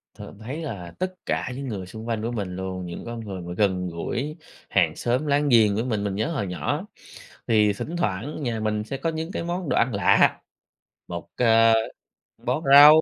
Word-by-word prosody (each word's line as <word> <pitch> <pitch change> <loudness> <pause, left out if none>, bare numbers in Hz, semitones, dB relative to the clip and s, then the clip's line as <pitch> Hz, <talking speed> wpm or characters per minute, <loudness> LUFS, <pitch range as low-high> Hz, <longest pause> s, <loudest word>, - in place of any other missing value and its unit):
Thường - - -11
thấy 125 +7 -6
là 100 - -6
tất 185 0 -1
cả - - -1
những 135 +1 -5
người 100 -6 -4
xung 110 +5 -9
quanh 115 -2 -1
của 115 +2 -2
mình 100 -6 -3
luôn, 95 -1 -4
những 85 - -7
con 120 0 -5
người 100 -5 -6
mà 85 0 -6
gần 95 -3 +1
gũi 130 - -4 0.3
hàng - - +2
xóm 125 +5 0
láng 145 0 +2
giềng 110 -4 +5
với 110 - 0
mình, 110 -5 -1
mình 100 -2 -2
nhớ 110 +8 0
hồi 135 - -2
nhỏ. 90 - -2 0.6
Thì 105 -2 +4
thỉnh 160 +11 -5
thoảng 140 - -2
nhà 120 -4 -1
mình 105 -1 -1
sẽ 135 +5 -5
có 165 - -1
những 160 +2 -4
cái - - -3
món 175 -1 -3
đồ - - +1
ăn 130 - +2
lạ, 100 -2 +4 0.7
một, 85 -1 -6
ờ, 115 -1 +5 0.7
bó 155 - 0
rau, 150 +2 +10
115 Hz, 210 wpm, -25 LUFS, 100-140 Hz, 0.7 s, rau